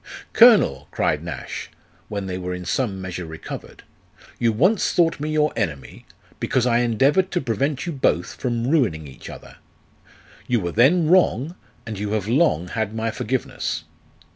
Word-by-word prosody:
" - - -24
Colonel," 220 - +6
cried 75 0 0
Nash, 85 -6 -6 0.4
when 100 -2 -4
they 90 -1 -4
were 90 0 -4
in 90 0 -7
some 105 -5 -1
measure 90 -2 -6
recovered, 80 0 -9 0.3
" 105 - -24
you 115 -1 +3
once 180 - +2
thought 165 -3 +2
me 150 +1 -3
your 155 0 +1
enemy, 80 -11 -4 0.3
because 130 -2 +1
I 120 -1 +3
endeavoured 135 - +2
to 180 - -1
prevent 135 - -1
you 175 - -3
both 110 - 0
from 120 -2 -2
ruining 115 - +1
each 65 -2 -11
other; - - -11 0.9
you 120 -2 +2
were 85 -3 -3
then 150 - +4
wrong, 165 -4 +3 0.3
and 110 -3 -6
you 105 0 -2
have 105 -2 -1
long 115 - +2
had 110 +1 -3
my 115 0 -1
forgiveness. 125 +3 -3
115 Hz, 165 wpm, -22 LUFS, 95-145 Hz, 0.9 s, Colonel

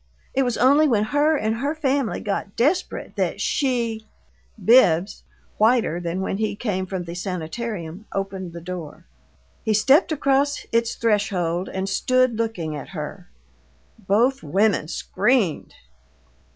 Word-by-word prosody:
It 270 - +2
was 245 -3 0
only 280 +6 +5
when 220 -6 +2
her 290 +7 +2
and 220 -2 -1
her 285 +6 -2
family 275 -5 0
got 200 -1 -3
desperate 295 +10 0
that - - -1
she 235 -5 -1 0.3
" 205 - -19
Bibbs 195 -6 +4 0.4
whiter 220 -6 +3
than 175 +2 -3
when 190 - -2
he 215 -1 -1
came 195 -4 -2
from 185 -1 -4
the 170 0 -7
sanitarium 180 +1 -5
opened 190 -3 -4
the 170 - -8
door. 170 -2 -7 0.6
He 220 -2 +1
stepped 275 - +4
across 285 -1 +1
its 230 0 +1
threshold 190 -6 0
and 190 0 -3
stook 255 +6 +2
looking 215 -9 -3
at 145 - -7
her. 175 +4 -7 0.8
Both 240 +7 +2
women 190 +2 +1
screamed. 210 - 0
215 Hz, 140 wpm, -23 LUFS, 180-255 Hz, 0.8 s, only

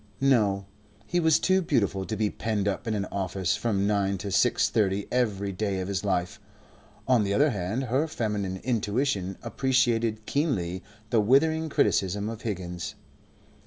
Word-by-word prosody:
No, 105 -8 +3 0.4
he 175 - 0
was 160 -2 +4
too 190 0 +2
beautiful 100 - 0
to 110 - -2
be 105 -1 0
penned 105 -3 -2
up 100 +3 -2
in 110 - 0
an 100 -1 -1
office 95 -2 -1
from 100 -4 0
nine 100 -1 +1
to 100 +2 -5
six 120 +5 +3
thirty 100 -2 0
every 105 -6 0
day 95 0 -2
of 95 - -3
his 100 0 -2
life. 90 -3 -1 0.7
On 125 -4 +4
the 100 0 0
other 145 +4 +4
hand 105 +5 -2
her 130 +5 0
feminine 105 -9 -2
intuition 105 -4 -1
appreciated 115 -3 +1
keenly 95 - -1 0.3
the 115 - +4
withering 160 +8 +3
criticism 100 -5 +1
of 115 -1 -7
Higgins. 90 -5 -4
105 Hz, 160 wpm, -27 LUFS, 95-125 Hz, 0.7 s, was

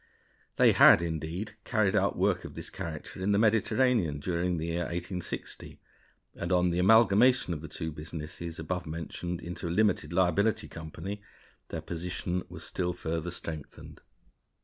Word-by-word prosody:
They - - +6
had, 85 - +8
indeed, 85 +6 -4
carried 110 -6 +1
out - - +2
work - - +1
of - - -9
this - - -6
character 80 +2 -6
in 100 +2 +2
the - - +3
Mediterranean 110 - +2
during 90 +2 -1
the 80 - -3
year 85 +1 -1
1860; 90 +1 -5 0.5
and 85 - -4
on 90 -1 +3
the 85 - 0
amalgamation 110 +1 +5
of 75 - -5
the 80 - -7
two 80 +1 -5
businesses 80 +2 -7
above 85 +2 -3
mentioned 85 +2 -5
into 85 0 -5
a - - -2
limited 90 -4 +2
liability 95 +5 +2
company, 85 +5 -7 0.5
their - - -5
position 90 +1 -3
was 85 -2 -8
still 90 +1 -2
further 85 0 -3
strengthened. 80 -4 -8
90 Hz, 150 wpm, -29 LUFS, 80-95 Hz, 0.5 s, had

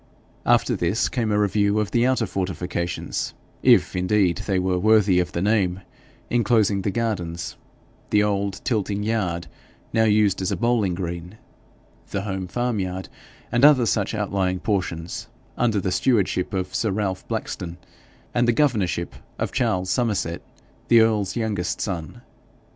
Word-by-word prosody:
After - - +3
this 90 +6 0
came 115 -4 -1
a 105 - +2
review 100 0 +2
of 105 -3 -1
the 120 +1 +3
outer 130 -3 +2
fortifications 90 -3 -3 0.3
if, - - +4
indeed, 90 -1 +2
they 95 -2 +1
were 90 0 +1
worthy 105 -2 +4
of 90 - -1
the 85 - -1
name 95 -3 +1 0.5
enclosing 110 -4 +2
the 100 - -1
gardens, 90 -7 -3 0.5
the 105 0 +4
old 100 -1 -1
tilting 105 -3 -1
yard, 95 -6 -1 0.5
now 110 0 +4
used 105 -3 +3
as 95 - -1
a - - -1
bowling 115 -6 +1
green, 85 +2 -5 0.7
the 100 - -2
home 95 -2 -3
farmyard, 95 -5 -2 0.4
and 120 +2 +1
other 145 -5 +7
such 110 -1 0
outlying 95 -3 -1
portions 90 -5 -2 0.3
under 115 -4 +1
the 95 0 -1
stewardship 100 -6 +1
of 95 -1 -3
sir 110 - 0
Ralph 95 -2 -2
Blackstone 85 -1 -4 0.6
and 120 0 +2
the 120 - +4
governorship 110 - +1 0.2
of - - -2
Charles 90 0 0
Somerset, 100 -9 0 0.5
the 115 -1 +7
earl's 105 -4 +1
youngest 105 -7 -2
son. 85 -6 -4
100 Hz, 145 wpm, -23 LUFS, 90-110 Hz, 0.7 s, other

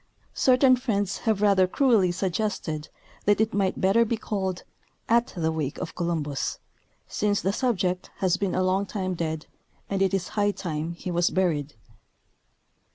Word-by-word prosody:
Certain 255 0 +5
friends 205 -6 -1
have 210 -2 +1
rather 195 -3 +5
cruelly 215 -5 +3
suggested 175 -4 -2 0.4
that 205 0 +3
it 220 0 +1
might 195 -2 0
better 195 +5 +4
be 230 0 -1
called 190 -4 -3 0.4
^^At 235 -5 +1
the 160 -1 +1
wake 155 -2 -3
of - - -5
Columbus," 160 -5 -2 0.5
since 205 -1 0
the 195 - 0
subject 190 -7 0
has 185 -2 +2
been 195 0 -1
a 185 - +2
long 190 +2 +1
time 185 -3 -2
dead, 160 -2 -3 0.5
and 195 -1 0
it 195 - +3
is 180 -2 -2
high 205 -1 +1
time 170 -4 -4
he 180 +1 -6
was 175 0 +2
buried. 155 -7 0
190 Hz, 160 wpm, -26 LUFS, 175-205 Hz, 0.5 s, Certain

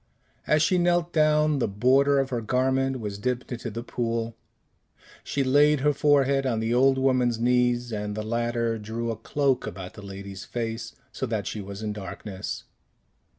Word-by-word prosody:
As 150 0 +4
she 180 +3 +3
knelt 175 -1 +1
down, 155 -1 +3
the - - +1
border 130 +7 +3
of 135 -1 0
her 120 -2 -1
garment 130 +3 +1
was 105 -3 -5
dipped 125 +4 -2
into 120 -1 -4
the 115 +2 -6
pool; 115 -2 -2 0.9
she 140 - -1
laid 145 +2 +4
her 150 +1 +3
forehead 140 -1 +3
on 120 -4 0
the 115 +1 0
old 135 +2 +4
woman's 130 -3 +2
knees, 125 0 +2
and 105 -1 -3
the 110 - -3
latter 115 0 -1
drew 115 +2 -3
a - - -3
cloak 135 +3 0
about 90 0 -7
the - - -11
lady's 100 -1 -8
face, 115 +3 -4 0.2
so - - -3
that - - -2
she 105 - -4
was 100 +2 -7
in 105 -1 -2
darkness. 100 -1 -6
120 Hz, 175 wpm, -26 LUFS, 110-135 Hz, 0.9 s, As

